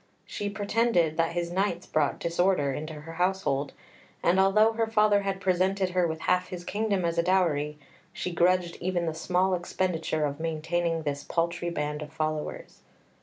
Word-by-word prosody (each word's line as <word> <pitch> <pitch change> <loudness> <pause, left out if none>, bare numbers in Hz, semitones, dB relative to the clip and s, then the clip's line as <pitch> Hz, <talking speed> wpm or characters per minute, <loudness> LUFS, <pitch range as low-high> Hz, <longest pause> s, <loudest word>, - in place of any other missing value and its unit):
She 205 - -4
pretended 205 -5 +1
that 165 0 +1
his 170 0 -2
knights 185 -1 -1
brought 150 -2 0
disorder 170 -4 +1
into 155 +3 -5
her 165 +2 -9
household; 175 -6 0 0.5
and 180 +2 +3
although 215 +3 +5
her 225 0 0
father 210 -2 +3
had 195 -1 -2
presented 190 0 +1
her 180 -1 +2
with 160 0 -4
half 180 +2 +1
his 180 -1 -7
kingdom 200 -1 -1
as 170 0 0
a - - +6
dowry, 165 -5 +1 0.3
she 180 -2 -4
grudged 175 0 +2
even 175 -1 0
the 160 - -1
small 180 +3 +1
expenditure 170 -3 -1
of 145 +1 -3
maintaining 165 +1 -1
this 145 -1 -3
paltry 170 +2 -1
band 150 -2 -3
of 150 -1 -7
followers. 155 -1 -4
175 Hz, 170 wpm, -28 LUFS, 160-190 Hz, 0.5 s, a